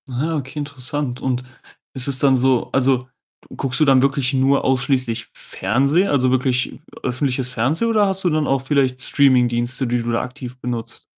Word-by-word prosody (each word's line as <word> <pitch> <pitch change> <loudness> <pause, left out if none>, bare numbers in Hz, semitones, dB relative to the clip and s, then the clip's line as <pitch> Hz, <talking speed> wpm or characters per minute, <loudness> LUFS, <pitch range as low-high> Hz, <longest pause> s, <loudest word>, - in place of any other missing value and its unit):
Ah, 145 +6 -2
okay, 140 0 -6
interessant. 140 -2 -4
Und 125 -1 -1 0.5
ist 130 -1 +2
es 135 -1 +1
dann 135 -2 +4
so 130 -1 +1
also, 130 -1 +1 0.5
guckst 130 -3 -2
du 155 - +4
dann 135 -2 +5
wirklich 140 -1 0
nur 135 +1 +2
ausschließlich 130 -3 0
Fernsehen, 140 - 0
also, 130 -3 +2
wirklich 130 0 0 0.2
öffentliches 130 0 -1
Fernsehen 135 - 0
oder 210 -3 +3
hast 195 0 -1
du 180 - +2
dann 155 -2 0
auch 135 -1 +1
vielleicht 135 -2 0
Streamingdienste, 125 -2 +2
die 120 0 0
du 120 0 -3
da 115 - 0
aktiv 125 -1 -8
benutzt? 120 -1 -5
130 Hz, 170 wpm, -20 LUFS, 125-140 Hz, 0.5 s, dann